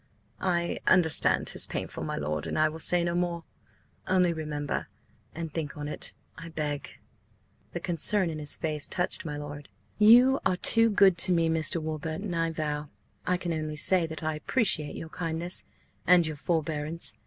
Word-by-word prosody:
"I 170 -2 -1
understand 160 -4 +4
'tis - - +2
painful, - - -5
my - - -3
lord, 75 0 -3
and - - -3
I 155 0 +3
will 160 +1 -9
say 175 +2 +2
no 170 0 -1
more. 175 -1 -2 0.6
Only 180 -2 +2
remember–and 155 +1 -6
think 150 -4 -5
on 145 0 -5
it, 150 - -5 0.2
I 165 - -9
beg!" 150 -3 -5 0.8
The - - -4
concern 175 +2 0
in 155 - -6
his 150 -1 0
face 155 -2 -3
touched 180 -1 -2
my 150 -2 -4
lord. 145 0 -8 0.3
"You 245 +5 +6
are 180 - +1
too 230 +4 +6
good 195 -4 +4
to 185 - +5
me, 165 -2 +2
Mr. 160 0 +2
Warburton, 160 +4 -4
I 165 0 0
vow. 150 -2 -4 0.4
I 180 - +2
can 175 -2 -3
only 155 -1 -4
say 175 +1 +5
that 160 -1 -7
I 155 0 -1
appreciate 155 - 0
your 160 - -7
kindness–and 175 +1 0
your 155 -1 -3
forbearance. 160 0 -2
165 Hz, 165 wpm, -27 LUFS, 155-175 Hz, 0.8 s, You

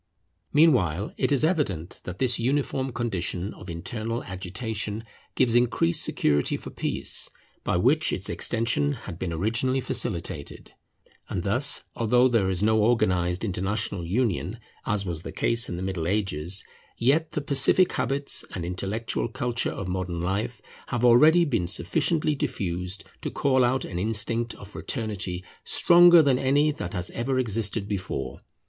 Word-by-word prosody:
Meanwhile 110 - +3
it - - 0
is 140 0 +2
evident 140 - -1
that 90 0 -6
this 125 +1 +1
uniform 135 +1 0
condition 100 -5 -2
of 95 - -11
internal 110 +7 -4
agitation 100 +4 -4 0.3
gives 125 -3 +2
increased 120 -8 +2
security 75 -1 +1
for - - -9
peace, - - -2 0.3
by - - 0
which 140 - +3
its 95 - -1
extension 115 +6 +1
had 95 -9 -8
been 90 - -3
originally 115 +10 0
facilitated. 85 - -2 0.6
And 90 - -3
thus, 130 +9 +1
although 120 +2 +3
there 115 -6 +2
is 95 +1 -1
no 110 +1 +3
organized 90 -6 +1
international 100 0 -2
union 100 +1 -1 0.3
as 105 -2 0
was 85 -3 -4
the - - -7
case 115 0 +1
in 85 - -4
the 90 - -4
Middle 95 -4 -2
Ages, 95 -2 -1 0.3
yet 145 +7 +2
the 150 - -1
pacific 140 +6 +4
habits 140 +1 0
and 90 -3 -4
intellectual 100 +7 -2
culture 120 0 -2
of 95 - -5
modern 90 -2 -3
life 100 +7 -2 0.2
have 120 -1 0
already 155 +9 +6
been 115 - 0
sufficiently 150 - +1
diffused 90 -7 -3 0.2
to - - -3
call 130 -2 +2
out 125 +2 +1
an 90 - -5
instinct 115 +3 0
of 100 - -12
fraternity 100 -7 -4 0.2
stronger 175 -1 +6
than 135 -3 +3
any 145 +3 +3
that 90 -11 -6
has 90 0 -1
ever 130 +3 -1
existed 110 -3 0
before. 95 - -4
110 Hz, 150 wpm, -26 LUFS, 90-130 Hz, 0.6 s, already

